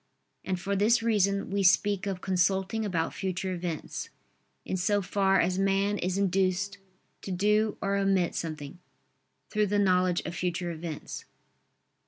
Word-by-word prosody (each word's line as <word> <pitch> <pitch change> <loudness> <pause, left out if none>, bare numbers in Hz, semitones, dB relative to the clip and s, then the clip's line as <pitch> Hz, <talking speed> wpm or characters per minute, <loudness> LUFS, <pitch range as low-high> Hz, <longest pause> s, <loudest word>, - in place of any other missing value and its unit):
And 185 -1 -2
for 200 +3 -2
this 225 +4 +3
reason 200 -4 +1
we 200 0 +1
speak 200 +1 +3
of 190 -2 -3
consulting 190 +3 +1
about 170 -6 -1
future 185 0 -3
events, 170 -3 -4 0.6
in - - -2
so 200 +3 +1
far 195 0 +2
as 185 +2 +1
man 195 +1 +1
is 185 +1 -1
induced 195 +1 0 0.4
to - - -8
do 210 +3 +2
or 200 0 +1
omit 195 -3 +2
something, 155 -1 -5 0.7
through 210 -1 +2
the 205 +1 +1
knowledge 185 -3 +3
of - - -6
future 175 0 -2
events. 160 -2 -6
190 Hz, 145 wpm, -28 LUFS, 180-200 Hz, 0.7 s, this